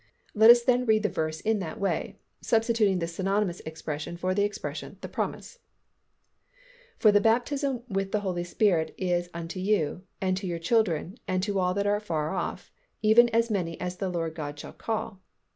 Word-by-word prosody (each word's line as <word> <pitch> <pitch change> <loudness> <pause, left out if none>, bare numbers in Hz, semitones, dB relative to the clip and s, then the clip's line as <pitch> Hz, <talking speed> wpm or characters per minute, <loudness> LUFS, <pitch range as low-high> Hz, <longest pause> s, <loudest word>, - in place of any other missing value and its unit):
Let 220 +2 +6
us 240 0 +8
then 250 0 +2
read 215 -1 +3
the 210 - +2
verse 155 0 -3
in 220 -1 +1
that 170 -4 -5
way, 200 - -2 0.2
substituting 225 -4 +2
this 170 -1 -3
synonymous 195 0 0
expression 160 +1 -5
for 185 +1 -1
the 200 - +1
expression 205 0 -4
"the - - -5
promise," - - -4 1.4
"For 215 - +5
the 205 0 +4
baptism 250 +3 +1
with 195 -3 -2
the 190 -4 -1
Spirit 175 -2 +1
is 175 -1 -1
unto 170 +2 -6
you, 185 -4 0 0.2
and 185 -1 +1
to 195 -1 -4
your 170 -1 -2
children 180 0 0
and 185 0 0
to 200 -1 0
all 180 0 +1
that 200 0 0
are 205 0 +2
afar 165 -6 -2
off, 180 0 -4 0.3
even 230 +3 +6
as 230 0 +1
many 170 -5 -2
as 180 0 -4
the 190 -1 -2
Lord 165 -2 -2
our 150 - -2
God 145 0 -8
shall - - -9
call." 220 -3 -4
195 Hz, 185 wpm, -27 LUFS, 175-220 Hz, 1.4 s, us